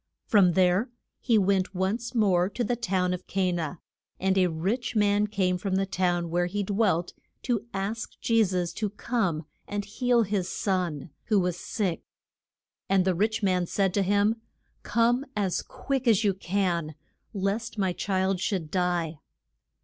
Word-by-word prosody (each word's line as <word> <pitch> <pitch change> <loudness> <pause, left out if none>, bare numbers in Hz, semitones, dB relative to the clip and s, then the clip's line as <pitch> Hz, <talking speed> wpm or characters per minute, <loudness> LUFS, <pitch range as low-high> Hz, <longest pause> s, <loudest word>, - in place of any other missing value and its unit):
From 190 -5 +5
there 185 +6 +3 0.3
he 235 -4 +3
went 190 -1 +1
once 220 +7 -2
more 190 -5 +3
to 240 - -2
the 240 +2 0
town 185 -5 0
of 180 0 -6
Ca 190 -2 +1
na. 170 -1 -2 0.4
And 190 0 +1
a 185 -1 +4
rich 195 +10 -2
man 205 0 +3
came 185 -3 0
from 190 0 -1
the 195 0 +1
town 175 -3 0
where 175 +1 +1
he 205 +3 -2
dwelt 195 -4 +1 0.3
to 235 -3 -1
ask 200 +4 -4
Je 230 -1 +3
sus 180 -3 -1
to 215 -2 -2
come 195 -7 -1 0.2
and 205 0 -3
heal 240 +2 +2
his 195 -3 -1
son, 175 -6 -2
who 215 -3 +3
was 180 -2 0
sick. 190 -3 -2 0.9
And 190 -1 +3
the 190 - +3
rich 215 +4 0
man 180 -2 +2
said 195 -1 +1
to 200 - +2
him, 205 +3 +2 0.4
Come 235 +3 +2
as 195 -4 0
quick 260 0 -3
as 225 -2 +4
you 200 -2 +3
can, 180 -5 -1 0.4
lest 205 +3 -2
my 190 -3 +1
child 190 0 0
should 180 -6 -2
die. 175 -4 0
195 Hz, 165 wpm, -27 LUFS, 180-215 Hz, 0.9 s, From